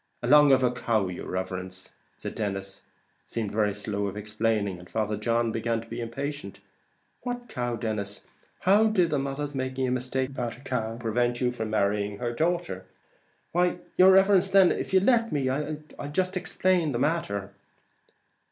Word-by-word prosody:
"Along 145 +3 +7
of 135 0 +5
the 125 -1 +3
cow, 110 -5 0
yer 90 - -6
riverence." 95 0 -5 0.3
Denis 95 -2 -4 0.5
seemed 110 -3 -3
very 105 -2 +1
slow 100 -1 -2
of 100 +1 -5
explaining, 105 -2 -1
and 90 - -14
Father 110 -1 -1
John 115 +2 0
began 115 +1 -1
to 115 - -11
be 115 +1 -5
impatient. 140 +6 -5 0.6
"What 245 -1 -4
cow, 120 - -2
Denis? 105 -3 -4 0.4
How 200 +4 +5
did 185 -7 +2
the 145 - +1
mother's 140 +1 -3
making 130 -1 -2
a - - 0
mistake 130 +1 -1
about 120 -4 -3
the 125 - -16
cow 115 -4 -3
prevent 120 +1 0
your 125 -1 +1 0.2
marrying 105 -1 0
her 120 +1 -2
daughter?" 165 - -1 0.7
"Why, 175 +1 +2 0.2
yer 185 +1 +7
riverence, 195 0 +5
then, 190 -1 +6
if - - -3
you'll 190 0 +4
let 230 0 +3
me, 140 -3 0
I'll 150 +3 -2 0.3
jist 185 +4 0
explain 180 -4 +1
the - - 0
matter. 120 - -1
120 Hz, 160 wpm, -27 LUFS, 105-155 Hz, 0.7 s, Along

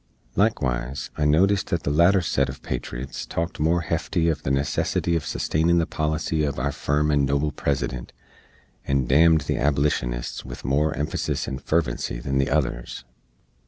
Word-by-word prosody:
Likewise, 65 - 0
I 75 - 0
notist 95 +7 +3
that 85 - -2
the 70 - 0
latter 85 +5 +5
set 85 - +1
uv - - -8
patriots 60 +1 -5
talked 85 +1 -3
more 85 +3 +2
hefty 85 +2 -1
uv 80 -2 +1
the - - -3
necessity 70 +4 0
uv 85 -1 +2
sustainin 80 +4 +1
the 85 - +2
policy 80 +1 -1
uv 75 -2 0
our 65 +4 0
firm 75 +2 0
and 70 -1 +3
noble 70 +2 +1
President, 65 -3 -2 0.7
and 70 -2 0
damned 80 +4 +5
the 70 - -2
Ablishunists 70 -3 0
with - - -9
more 70 +4 +1
emphasis 75 +2 -2
and 65 0 -4
fervency 70 -6 -1
than 70 +2 -1
the 70 +1 +1
others. 65 -4 -2
75 Hz, 160 wpm, -24 LUFS, 65-80 Hz, 0.7 s, latter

